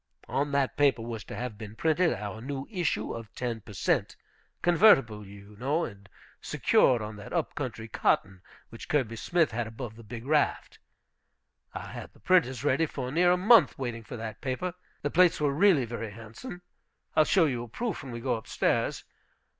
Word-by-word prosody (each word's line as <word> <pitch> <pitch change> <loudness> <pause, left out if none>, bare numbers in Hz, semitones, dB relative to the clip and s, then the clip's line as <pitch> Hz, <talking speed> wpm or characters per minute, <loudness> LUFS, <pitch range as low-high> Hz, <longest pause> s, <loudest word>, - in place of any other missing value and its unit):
On 145 +1 -1
that 140 -2 0
paper 135 -6 +3
was 115 -2 -5
to - - -8
have 120 -4 -5
been 110 0 -8
printed 160 +7 +2
our 105 0 -5
new 135 +2 -5
issue 170 - -1
of 115 -3 -8
ten 120 -3 -3
per 105 - -12
cent., 90 - 0 0.5
convertible, 135 - +5
you 100 +1 -13
know, 145 +7 0
and 100 -2 -11 0.3
secured 120 -4 +3
on 105 0 -7
that 105 - -10
up 170 -3 -1
country 115 -5 -5
cotton, 95 -3 0 0.3
which 115 - -10
Kirby 130 -6 +1
Smith 165 +6 +1
had 115 0 -2
above 110 0 -7
the 115 - -12
Big 115 +2 -8
Raft. 150 +1 0 1.0
I - - -5
had - - -8
the - - -21
printers 135 - +2
ready 145 +3 +2
for 130 -3 -5
near 175 +4 +4
a 180 - +4
month 200 - +6
waiting 120 -3 -4
for 120 - -8
that 110 -1 -7
paper. 155 +6 -2 0.3
The 145 - -1
plates 180 -1 +4
were 145 -2 +1
really 160 -4 +4
very 115 -1 -5
handsome. 115 - -10 0.5
I'll 155 - +6
show 175 +2 +4
you 125 -5 -1
a 120 - -7
proof 230 - -3
when 135 -3 -8
we 115 0 -6
go 125 0 0
up 110 - -11
stairs. - - 0
125 Hz, 190 wpm, -28 LUFS, 110-155 Hz, 1.0 s, month